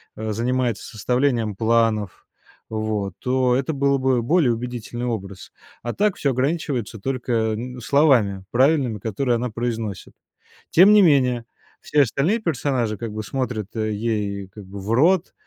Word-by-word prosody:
э, 110 Hz, 0 st, -4 dB
занимается 120 Hz, 0 st, -1 dB
составлением 120 Hz, -1 st, 0 dB
планов, 110 Hz, -3 st, 0 dB, 0.4 s
вот 110 Hz, -3 st, -2 dB
то 125 Hz, -1 st, +1 dB
это 135 Hz, +4 st, -1 dB
было 140 Hz, 0 st, +2 dB
бы 130 Hz, -2 st, +2 dB
более 145 Hz, -3 st, +3 dB
убедительный 120 Hz, 0 st, -5 dB
образ. 100 Hz, -5 st, -5 dB, 0.3 s
А 120 Hz, -, -2 dB
так 210 Hz, -1 st, +1 dB
всё 140 Hz, -, +1 dB
ограничивается 130 Hz, -5 st, -2 dB
только 115 Hz, -3 st, -1 dB
н 125 Hz, +2 st, -7 dB
словами 115 Hz, -9 st, +3 dB
правильными, 130 Hz, -4 st, +2 dB
которые 120 Hz, +4 st, -1 dB
она 120 Hz, +1 st, -2 dB
произносит. 115 Hz, -2 st, -4 dB, 0.6 s
Тем 190 Hz, +5 st, +7 dB
не 210 Hz, -, +7 dB
менее, 125 Hz, -7 st, +3 dB, 0.4 s
все 150 Hz, -, +2 dB
остальные 145 Hz, -, 0 dB
персонажи 130 Hz, -, -1 dB
как 115 Hz, 0 st, -5 dB
бы 110 Hz, 0 st, -4 dB
смотрят, 125 Hz, -3 st, -3 dB
э, 110 Hz, -1 st, -1 dB
ей 105 Hz, -3 st, -2 dB
как 105 Hz, 0 st, -12 dB
бы 100 Hz, +2 st, -9 dB
в 100 Hz, +3 st, -5 dB
рот, 165 Hz, +9 st, +3 dB
120 Hz, 145 wpm, -22 LUFS, 110-135 Hz, 0.6 s, Тем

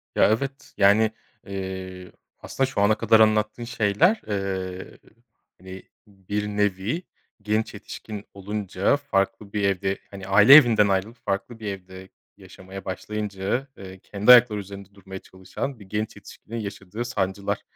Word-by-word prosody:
Ya -, -, +5 dB
evet, 135 Hz, +5 st, -3 dB
yani, 105 Hz, +2 st, +4 dB, 0.4 s
ııı, 95 Hz, -1 st, -6 dB, 0.3 s
aslında 135 Hz, -1 st, -1 dB
şu 100 Hz, -, -2 dB
ana 105 Hz, +1 st, +4 dB
kadar 110 Hz, -, +4 dB
anlattığın 110 Hz, +1 st, +2 dB
şeyler, 115 Hz, -, +2 dB
eee, 95 Hz, -2 st, -4 dB, 0.6 s
hani, 95 Hz, 0 st, -10 dB, 0.2 s
bir 105 Hz, +1 st, -4 dB
nevi 105 Hz, -, -1 dB, 0.4 s
genç 105 Hz, +1 st, -1 dB
yetişkin 105 Hz, -2 st, -8 dB
olunca 100 Hz, +3 st, -1 dB
farklı 100 Hz, -6 st, -2 dB
bir 105 Hz, -1 st, -1 dB
evde, 95 Hz, 0 st, 0 dB
hani, 95 Hz, -1 st, -9 dB
aile 105 Hz, +6 st, +7 dB
evinden 115 Hz, -8 st, +6 dB
ayrılıp 100 Hz, +5 st, -1 dB
farklı 100 Hz, +4 st, -3 dB
bir 110 Hz, -, -6 dB
evde 95 Hz, -1 st, -8 dB, 0.3 s
yaşamaya 95 Hz, 0 st, -11 dB
başlayınca, 105 Hz, +5 st, -3 dB
eee, 95 Hz, -1 st, -10 dB
kendi 105 Hz, +5 st, +3 dB
ayakları 120 Hz, -4 st, +7 dB
üzerinde 100 Hz, 0 st, -10 dB
durmaya 95 Hz, -1 st, -9 dB
çalışan 95 Hz, +9 st, -7 dB
bir 100 Hz, -, -13 dB
genç 105 Hz, +2 st, -4 dB
yetişkinin 105 Hz, +3 st, -10 dB
yaşadığı 105 Hz, +2 st, -6 dB
sancılar, 100 Hz, -4 st, -2 dB
100 Hz, 135 wpm, -24 LUFS, 95-110 Hz, 0.6 s, aile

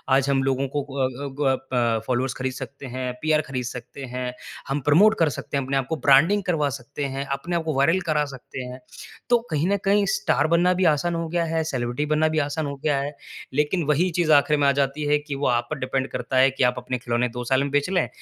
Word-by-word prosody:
आज 135 Hz, +1 st, +2 dB
हम 135 Hz, -1 st, +2 dB
लोगों 135 Hz, 0 st, 0 dB
को 145 Hz, -, 0 dB
क -, -, -9 dB
अ, 130 Hz, +2 st, -2 dB
ग 135 Hz, -2 st, +2 dB, 0.2 s
प 115 Hz, -3 st, +1 dB
फॉलोवर्स 130 Hz, 0 st, 0 dB
ख़रीद 130 Hz, 0 st, -3 dB
सकते 140 Hz, +2 st, -8 dB
हैं, 130 Hz, 0 st, -4 dB
पीआर 155 Hz, 0 st, +2 dB
ख़रीद 130 Hz, -3 st, -3 dB
सकते 125 Hz, +2 st, -8 dB
हैं, 125 Hz, 0 st, -4 dB, 0.3 s
हम 140 Hz, +1 st, -1 dB
प्रोमोट 195 Hz, -, +5 dB
कर 165 Hz, -2 st, +4 dB
सकते 140 Hz, -, -4 dB
हैं 140 Hz, -, -1 dB
अपने 135 Hz, +1 st, -1 dB
आप 135 Hz, -, 0 dB
को, 160 Hz, -, 0 dB
ब्रांडिंग 155 Hz, +8 st, +4 dB
करवा 160 Hz, -6 st, +1 dB
सकते 140 Hz, +2 st, -6 dB
हैं, 135 Hz, 0 st, -3 dB
अपने 155 Hz, +6 st, -3 dB
आप 170 Hz, -, 0 dB
को 160 Hz, -1 st, -2 dB
वायरल 165 Hz, +7 st, +3 dB
करा 150 Hz, -1 st, +2 dB
सकते 135 Hz, -1 st, -8 dB
हैं। 125 Hz, +1 st, -8 dB, 0.5 s
तो 240 Hz, -, +6 dB
कहीं 155 Hz, +2 st, +1 dB
न 200 Hz, -, +2 dB
कहीं, 200 Hz, +1 st, +3 dB
स्टार 155 Hz, -7 st, +1 dB
बनना 170 Hz, +2 st, +3 dB
भी 185 Hz, +1 st, +1 dB
आसान 170 Hz, +4 st, -1 dB
हो 165 Hz, 0 st, -2 dB
गया 170 Hz, +1 st, 0 dB
है, 160 Hz, 0 st, 0 dB
सेलिब्रिटी 130 Hz, -2 st, -2 dB
बनना 155 Hz, +1 st, +2 dB
भी 155 Hz, 0 st, 0 dB
आसान 150 Hz, +1 st, -1 dB
हो 140 Hz, 0 st, -4 dB
गया 145 Hz, -2 st, +2 dB
है। 145 Hz, +1 st, -4 dB, 0.4 s
लेकिन 150 Hz, +5 st, +1 dB
वही 155 Hz, +5 st, +2 dB
चीज़ 165 Hz, -2 st, +2 dB
आखिर 150 Hz, +1 st, +4 dB
में 145 Hz, -1 st, +3 dB
आ -, -, +6 dB
जाती 140 Hz, +2 st, -2 dB
है 150 Hz, -, +5 dB
कि 145 Hz, -1 st, -6 dB
वो 140 Hz, +1 st, -1 dB
आप 120 Hz, -1 st, +1 dB
पर 155 Hz, -, -3 dB
डिपेंड 130 Hz, 0 st, -1 dB
करता 130 Hz, -, -2 dB
है 135 Hz, +1 st, +6 dB
कि 135 Hz, 0 st, -1 dB
आप 125 Hz, 0 st, +3 dB
अपने 125 Hz, +1 st, -3 dB
खिलौने 120 Hz, 0 st, 0 dB
2 125 Hz, +1 st, -5 dB
साल 130 Hz, +2 st, +2 dB
में 140 Hz, -, -3 dB
बेंच 145 Hz, +3 st, +1 dB
लें 185 Hz, -1 st, +1 dB
140 Hz, 255 wpm, -24 LUFS, 130-155 Hz, 0.5 s, तो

